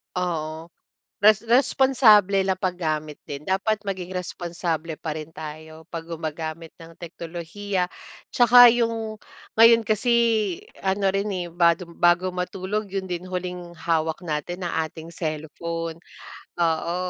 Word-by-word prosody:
Oo, 165 -2 -3 0.5
res 215 +1 +5
responsable 230 -6 +4
na 190 - +2
paggamit 155 -5 -3
din 145 0 -6
dapat 195 +5 0
maging 185 -2 -5
responsable 170 -2 -3
pa 155 -1 -5
rin 155 +1 -10
tayo 155 +1 -9
'pag 165 -1 -6
gumagamit 160 0 -5
ng 165 0 -13
teknolohiya, 175 +3 -4 0.4
'tsaka 245 0 +8
yung 225 -2 -1 0.4
ngayon 230 0 +8
kasi 215 +3 0 0.7
ano 195 0 +1
rin 195 +2 -1
eh 180 -2 -3
bag 170 +1 +3 0.2
badu 175 +1 +3
matulog 190 +3 -3
yun 195 0 -3
din 180 -1 -5
huling 180 -1 -5
hawak 160 -1 -1
natin 175 +3 -4
ang 160 -2 -1
ating 160 +1 -11
cellphone, 165 +1 -4 0.6
oo 170 0 0
175 Hz, 125 wpm, -24 LUFS, 165-195 Hz, 0.7 s, tsaka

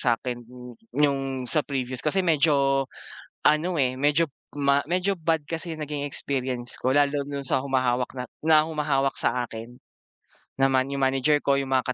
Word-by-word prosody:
sa'kin 120 0 -1 0.5
nung 135 -3 +1
sa 155 +5 +1
previous. 130 -3 -3
Kasi 180 +5 +1
medyo 140 -4 +3 0.6
ano, 160 +3 +3
eh, 130 -2 +2
medyo 145 +5 +2 0.3
m 140 0 +3
medyo 185 +2 +1
bad 160 -3 -1
kasi 165 0 -4
yung - - -4
naging 145 -1 -4
experience 130 -3 -3
ko 130 - 0
lalo 145 0 +3
dun 140 -1 -4
sa - - +2
humahawak 130 -2 0 0.3
na 155 -1 +5
humahawak 145 -4 0
sa 125 -1 0
akin. 115 +2 -9 0.8
Naman 135 0 +2
yung 140 0 -3
manager 135 +2 +3
ko, 140 0 +3
yung 135 - -5
mga 130 -1 +1
140 Hz, 155 wpm, -25 LUFS, 130-150 Hz, 0.8 s, na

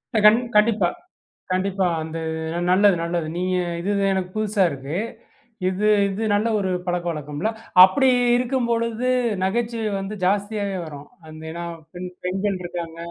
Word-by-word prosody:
இல்ல - - +4
கண் 215 +3 +8 0.2
கண்டிப்பா. 210 -3 +4 0.6
கண்டிப்பா. 190 0 +1 0.2
அந்து 160 +1 -5 0.5
நல்லது, 195 +1 +5
நல்லது. 170 -2 -2
நீங்க 185 +1 0 0.2
இது 200 +3 -1 0.2
எனக்கு 185 -1 -2
புதுசா 210 -2 +1
இருக்கு. 140 +2 -6 0.7
இது 195 +3 0 0.2
இது 200 +3 -3
நல்ல 205 +3 +2
ஒரு 190 - -1 0.2
பழக்கவழக்கம்ல? 170 0 -2 0.3
அப்படி 265 +9 +5 0.3
இருக்கும் 250 0 0
பொழுது 230 +2 0 0.3
நகைச்சுவை 225 +2 -1
வந்து 195 +2 -5
ஜாஸ்தியாவே 200 0 0
வரும், 145 -1 -9 0.2
அந்த 155 0 -10
ஏன்னா 170 +1 -5 0.3
பெண் 180 0 -6 0.2
பெண்கள் 195 +2 -1
இருக்காங்க. 170 -1 -6
190 Hz, 135 wpm, -23 LUFS, 175-215 Hz, 0.7 s, கண்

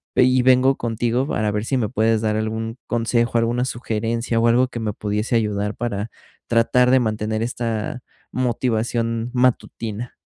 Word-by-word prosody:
Ve 125 - +6
y 130 0 +4
vengo 130 +1 +4
contigo, 120 +3 -1
para 105 -6 0
ver 105 0 -2
si 135 - 0
me 110 -4 0
puedes 110 -2 +1
dar 110 -1 0
algún 110 +1 -3
consejo, 120 0 +1
alguna 120 +2 +1
sugerencia 115 -1 -2
o 115 - +3
algo 125 +2 +4
que 120 - -6
me 110 -2 -2
pudiese 105 +3 -2
ayudar, 105 -2 0
para 110 -2 -3 0.4
tratar 120 +2 +3
de 130 - +6
mantener 110 -1 -1
esta 115 0 -3 0.3
motivación 115 -1 -1
matutina. 120 -2 -1
115 Hz, 160 wpm, -21 LUFS, 110-125 Hz, 0.4 s, Ve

